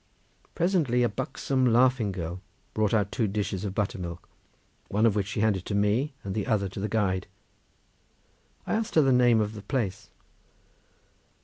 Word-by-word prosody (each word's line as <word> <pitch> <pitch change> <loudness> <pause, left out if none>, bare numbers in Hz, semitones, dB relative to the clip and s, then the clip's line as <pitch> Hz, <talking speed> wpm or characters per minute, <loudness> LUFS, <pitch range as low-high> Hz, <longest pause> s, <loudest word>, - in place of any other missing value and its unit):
Presently 160 -9 +2
a 120 - +2
buxom 130 +5 -2
laughing 125 -2 +3
girl 90 0 -5 0.3
brought 110 -1 +1
out 105 -3 +1
two 115 - 0
dishes 100 -1 -2
of 100 -2 -4
buttermilk, 90 -4 -3 0.6
one 105 +3 +1
of 110 -3 +3
which 100 -2 0
she 105 0 -2
handed 105 -4 +1
to 100 - -2
me 110 +8 +1
and 95 - -4
the 105 -1 -2
other 105 -5 +1
to 95 - -7
the 105 +2 -2
guide. 95 -3 0 1.4
I - - -2
asked 220 0 -1
her 155 - +6
the 135 - +3
name 120 -2 +5
of 105 0 -1
the 105 - -8
place. 100 -3 -3
105 Hz, 170 wpm, -27 LUFS, 100-125 Hz, 1.4 s, her